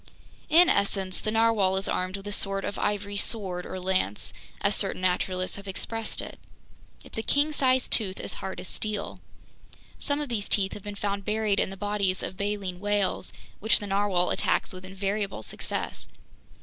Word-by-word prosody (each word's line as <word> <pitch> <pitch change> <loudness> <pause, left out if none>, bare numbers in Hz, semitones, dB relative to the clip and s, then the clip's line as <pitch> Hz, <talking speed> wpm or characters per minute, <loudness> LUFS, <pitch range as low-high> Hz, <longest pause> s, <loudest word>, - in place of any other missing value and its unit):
"In 345 +3 +8
essence, 195 - +2
the - - -2
narwhale 220 -4 +3
is 195 0 -1
armed 185 +2 -1
with 195 - -11
a 205 - -4
sort 195 -1 +1
of 200 - -3
ivory 205 0 -1
sword, 190 -5 0
or 185 - -5
lance, 185 - 0 0.3
as - - +2
certain 185 - +1
naturalists 185 +1 0
have 200 0 -9
expressed 225 +3 -2
it. - - -9 0.6
It's - - -6
a - - 0
king 290 +6 +2
sized 260 -3 +2
tooth 195 -4 +3
as - - -1
hard 190 -2 -4
as 180 - -7
steel. 210 -1 -3 0.8
Some 285 0 0
of 295 - -2
these 220 -5 -2
teeth 195 -2 +3
have - - -7
been 205 +1 -6
found 200 0 -2
buried 210 -1 +1
in - - +2
the 195 - -8
bodies 200 -2 0
of - - -4
baleen 200 -2 -2
whales, 205 -1 0 0.3
which 220 +2 +4
the 205 - -5
narwhale 195 -3 +2
attacks - - +1
with 185 0 -8
invariable 195 - -2
success. - - -4
200 Hz, 180 wpm, -27 LUFS, 190-210 Hz, 0.8 s, In